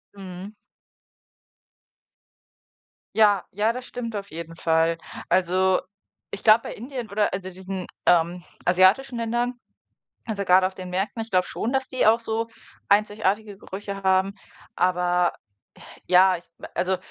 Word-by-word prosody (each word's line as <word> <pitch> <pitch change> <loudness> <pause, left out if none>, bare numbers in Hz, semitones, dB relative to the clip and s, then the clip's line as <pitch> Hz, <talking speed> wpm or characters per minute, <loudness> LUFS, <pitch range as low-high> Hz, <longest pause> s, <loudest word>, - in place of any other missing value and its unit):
Mhm. 190 +1 -9 2.6
Ja, 205 -3 +5
ja, 215 +4 +1
das 250 +1 -7
stimmt 230 -3 -6
auf 200 -1 -5
jeden 165 +1 -7
Fall. 165 0 +2 0.3
Also, 185 +1 +3 0.5
ich 200 - -6
glaube, 220 +1 +7
bei - - -6
Indien 245 -1 -6
oder, 205 +1 0
also, 185 0 -4
diesen, 190 0 -6 0.2
ähm, 175 +1 +3 0.2
asiatischen 190 +9 +4
Ländern, 240 +2 -1 0.7
also, 210 -3 -3
gerade 185 0 +5
auf 190 - -10
den 185 -1 -7
Märkten, 195 +5 -2
ich 225 - -7
glaube 185 -3 +2
schon, 230 - -3
dass 265 -1 0
die 255 - 0
auch 225 +2 +5
so 225 0 -2 0.4
einzigartige 205 0 +1
Gerüche 200 0 -7
haben, 190 +1 +2 0.4
aber, 180 -1 +2 0.7
ja, 185 0 +6
ich 170 - -14 0.3
also, 185 +2 +1
195 Hz, 135 wpm, -24 LUFS, 180-220 Hz, 2.6 s, glaube